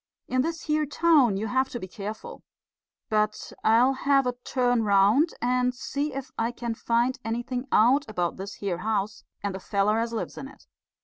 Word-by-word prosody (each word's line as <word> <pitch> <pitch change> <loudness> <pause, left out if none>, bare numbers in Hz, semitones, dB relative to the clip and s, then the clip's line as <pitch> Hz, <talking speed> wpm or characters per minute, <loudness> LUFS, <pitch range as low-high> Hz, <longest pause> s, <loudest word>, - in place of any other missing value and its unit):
In 255 0 +1
this 330 +3 -3
here 305 -1 0
town 290 -8 +3
you 210 - -2
have 260 +4 0
to 240 - -5
be 185 - -7
careful. 210 +3 -7 0.7
But 215 0 -1
I'll 235 +4 +5
have 275 0 +2
a 250 - 0
turn 245 -2 +1
round 210 - +4
and 250 0 +1
see 285 +4 -3
if 275 -1 -6
I 230 +1 +1
can 240 -1 -4
find 240 +3 0
anything 240 +3 -3
out 260 +6 +4
about 175 -5 -2
this 195 +1 -7
here 185 -4 -3
house 210 0 -2 0.2
and 200 -1 -2
the 190 - -5
feller 200 +3 +1
as 230 0 -1
lives 230 - -4
in 270 - -7
it." 270 - -17
240 Hz, 185 wpm, -26 LUFS, 210-265 Hz, 0.7 s, I'll